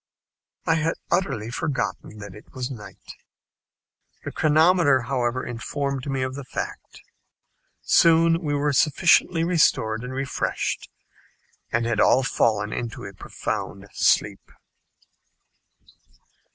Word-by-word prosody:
I 165 Hz, -, +3 dB
had 160 Hz, +1 st, 0 dB, 0.2 s
utterly 170 Hz, -, 0 dB
forgotten 130 Hz, -5 st, -3 dB
that 100 Hz, -2 st, -9 dB
it 105 Hz, -, -15 dB
was 130 Hz, 0 st, -4 dB
night. 105 Hz, -5 st, -11 dB, 1.1 s
The -, -, -5 dB
chronometer, 155 Hz, -2 st, +4 dB
however, 125 Hz, 0 st, -1 dB
informed 135 Hz, +3 st, -4 dB
me 135 Hz, -1 st, -1 dB
of 130 Hz, 0 st, -3 dB
the 140 Hz, +1 st, -7 dB
fact. 130 Hz, -, -7 dB, 0.8 s
Soon 165 Hz, 0 st, +4 dB
we 145 Hz, -3 st, -1 dB
were 145 Hz, 0 st, 0 dB
sufficiently 165 Hz, +3 st, +3 dB
restored 125 Hz, -10 st, +2 dB
and 125 Hz, -, -6 dB
refreshed, 135 Hz, -1 st, -2 dB, 0.8 s
and 120 Hz, 0 st, +1 dB
had 115 Hz, -2 st, -1 dB
all 130 Hz, -, +4 dB
fallen 105 Hz, -5 st, +1 dB
into 120 Hz, -2 st, -5 dB
a 100 Hz, -, -8 dB
profound 100 Hz, +1 st, -5 dB
sleep. -, -, +1 dB
135 Hz, 110 wpm, -24 LUFS, 115-155 Hz, 1.1 s, chronometer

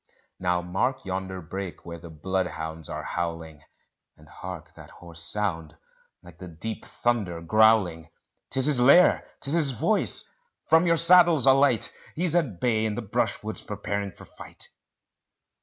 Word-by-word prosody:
Now 90 Hz, -1 st, -1 dB
mark 95 Hz, +10 st, -2 dB
yonder 95 Hz, 0 st, -5 dB
brake 95 Hz, +2 st, -7 dB
where 85 Hz, -1 st, -8 dB
the 85 Hz, 0 st, -12 dB
bloodhounds 80 Hz, -1 st, -4 dB
are -, -, -5 dB
howling; 80 Hz, -3 st, -5 dB, 0.6 s
And 75 Hz, -, -19 dB
hark 85 Hz, -1 st, -10 dB
that 80 Hz, -4 st, -14 dB
hoarse 85 Hz, -1 st, -12 dB
sound 85 Hz, -4 st, -3 dB, 0.5 s
like 85 Hz, -1 st, -16 dB
the 90 Hz, -, -9 dB
deep 95 Hz, +7 st, -7 dB
thunder 105 Hz, -8 st, -2 dB
growling; 90 Hz, -3 st, +2 dB, 0.4 s
'Tis 130 Hz, -1 st, +1 dB
his 145 Hz, -4 st, +2 dB
lair 140 Hz, +9 st, +5 dB, 0.2 s
'tis 140 Hz, -, -1 dB
his 155 Hz, -5 st, +2 dB
voice! 115 Hz, -, +3 dB, 0.4 s
from 165 Hz, +2 st, +3 dB
your 165 Hz, 0 st, +3 dB
saddles 170 Hz, -3 st, +6 dB
alight; 135 Hz, -3 st, +3 dB, 0.2 s
He's 170 Hz, 0 st, -1 dB
at 140 Hz, -, -1 dB
bay 110 Hz, -3 st, 0 dB
in 110 Hz, -1 st, -2 dB
the 120 Hz, -, -5 dB
brushwood 100 Hz, -, -3 dB
preparing 100 Hz, -1 st, -4 dB
for -, -, -15 dB
fight. -, -, -12 dB
95 Hz, 145 wpm, -25 LUFS, 85-125 Hz, 0.6 s, saddles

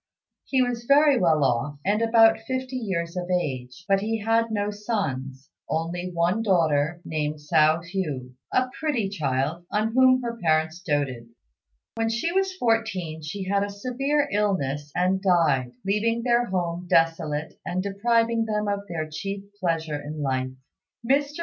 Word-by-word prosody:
He 260 Hz, -2 st, +2 dB
was 240 Hz, -1 st, -3 dB
very 285 Hz, 0 st, +5 dB
well 160 Hz, -5 st, +3 dB
off, 140 Hz, +3 st, 0 dB
and 205 Hz, +3 st, +2 dB
about 225 Hz, -1 st, +5 dB
fifty 260 Hz, +3 st, -4 dB
years 185 Hz, -8 st, -2 dB
of 180 Hz, 0 st, -4 dB
age, 140 Hz, -3 st, -2 dB
but 195 Hz, 0 st, +3 dB
he 225 Hz, +2 st, -1 dB
had 225 Hz, +2 st, +2 dB
no 205 Hz, -1 st, -1 dB
sons; 145 Hz, -, -4 dB, 0.2 s
only 175 Hz, +3 st, -2 dB
one 175 Hz, +5 st, +1 dB
daughter, 165 Hz, -5 st, +2 dB
named 150 Hz, -1 st, -2 dB
Hsiao 155 Hz, +2 st, +2 dB
hui, 155 Hz, -9 st, -4 dB, 0.2 s
a 255 Hz, 0 st, +2 dB
pretty 265 Hz, -11 st, 0 dB
child 150 Hz, -2 st, -1 dB
on 215 Hz, +2 st, 0 dB
whom 255 Hz, 0 st, +5 dB
her 235 Hz, -1 st, -4 dB
parents 160 Hz, 0 st, +1 dB
doted. 140 Hz, -9 st, -2 dB, 0.6 s
When 225 Hz, 0 st, -1 dB
she 235 Hz, +9 st, -1 dB
was 385 Hz, +1 st, +1 dB
fourteen 220 Hz, -, 0 dB
she 175 Hz, +6 st, -5 dB
had 200 Hz, +1 st, +1 dB
a 205 Hz, -, -3 dB
severe 260 Hz, +8 st, -1 dB
illness 150 Hz, -9 st, 0 dB
and 185 Hz, +2 st, +1 dB
died, 155 Hz, -10 st, +2 dB
leaving 225 Hz, +4 st, +1 dB
their 240 Hz, 0 st, +3 dB
home 175 Hz, -1 st, -2 dB
desolate 165 Hz, -2 st, +1 dB
and 185 Hz, +1 st, -2 dB
depriving 230 Hz, +3 st, +1 dB
them 210 Hz, -1 st, -1 dB
of 200 Hz, 0 st, 0 dB
their 160 Hz, -3 st, -3 dB
chief 195 Hz, +6 st, -5 dB, 0.2 s
pleasure 160 Hz, -5 st, -1 dB
in 150 Hz, +1 st, -5 dB
life. 130 Hz, -1 st, 0 dB, 0.6 s
Mr. 280 Hz, +2 st, +3 dB
185 Hz, 155 wpm, -25 LUFS, 155-225 Hz, 0.6 s, very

